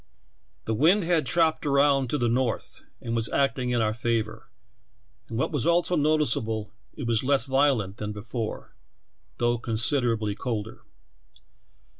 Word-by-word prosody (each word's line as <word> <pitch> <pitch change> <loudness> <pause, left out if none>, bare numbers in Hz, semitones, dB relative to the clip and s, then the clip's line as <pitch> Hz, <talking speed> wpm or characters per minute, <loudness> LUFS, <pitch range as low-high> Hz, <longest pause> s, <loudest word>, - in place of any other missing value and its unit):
The 110 - -1
wind 170 - +4
had 165 -2 +1
chopped 165 -2 +2
round 140 -2 +3
to 150 - 0
the 120 - 0
north 120 0 -1 0.2
and 115 -1 -2
was 115 -1 -1
acting 130 -2 0
in 120 -2 +1
our 110 0 0
favor, 115 -1 -2 0.8
and, 115 - -4
what 130 - 0
was 145 -1 -1
also 175 +1 +2
noticeable, 140 -9 0 0.2
it 145 - -5
was 115 -1 +1
less 135 -2 +3
violent 135 -8 +1
than 105 0 -4
before, 110 +2 -6 0.6
though 120 0 +1
considerably 115 -2 0
colder. 110 -1 -5
120 Hz, 140 wpm, -26 LUFS, 110-145 Hz, 0.8 s, wind